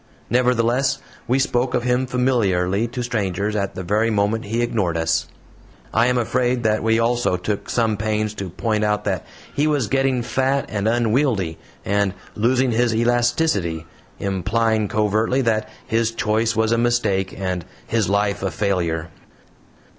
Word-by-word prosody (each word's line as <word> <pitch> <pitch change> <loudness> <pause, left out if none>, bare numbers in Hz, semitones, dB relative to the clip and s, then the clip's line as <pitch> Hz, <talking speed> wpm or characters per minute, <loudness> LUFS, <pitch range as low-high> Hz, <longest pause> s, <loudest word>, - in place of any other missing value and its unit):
Nevertheless, 125 +2 +2 0.3
we 125 - +2
spoke 125 -2 +1
of 120 - 0
him 125 +1 +1
familiarly 115 -6 +1
to 125 +1 -4
strangers 105 -3 -1
at 100 -2 -2
the 95 - -4
very 105 +5 +1
moment 105 +1 0
he 115 +3 -1
ignored 95 -8 0
us. 80 0 0 0.7
I 115 +2 +4
am 125 0 +2
afraid 125 +1 0
that 110 -1 +2
we 110 0 +2
also 115 -4 +1
took 100 +3 -3
some 115 -3 +1
pains 110 0 -1
to 100 -3 -5
point 110 +4 -1
out 105 0 +1
that 95 -3 -2 0.3
he 145 +2 +1
was 145 -5 +1
getting 130 +2 +1
fat 130 +4 0
and 105 0 -1
unwieldy, 115 - +1 0.3
and 100 -1 +1 0.2
losing 125 +3 +2
his 115 0 +2
elasticity, 120 - +1 0.3
implying 105 +3 0
covertly 110 +6 +1
that 110 -2 0 0.2
his 115 0 +1
choice 115 0 0
was 110 +1 +2
a 115 - +2
mistake 110 -6 0
and 90 -2 -2 0.2
his 115 -3 0
life 100 0 +1
a 95 - 0
failure. 85 -3 -1
110 Hz, 155 wpm, -21 LUFS, 100-120 Hz, 0.7 s, I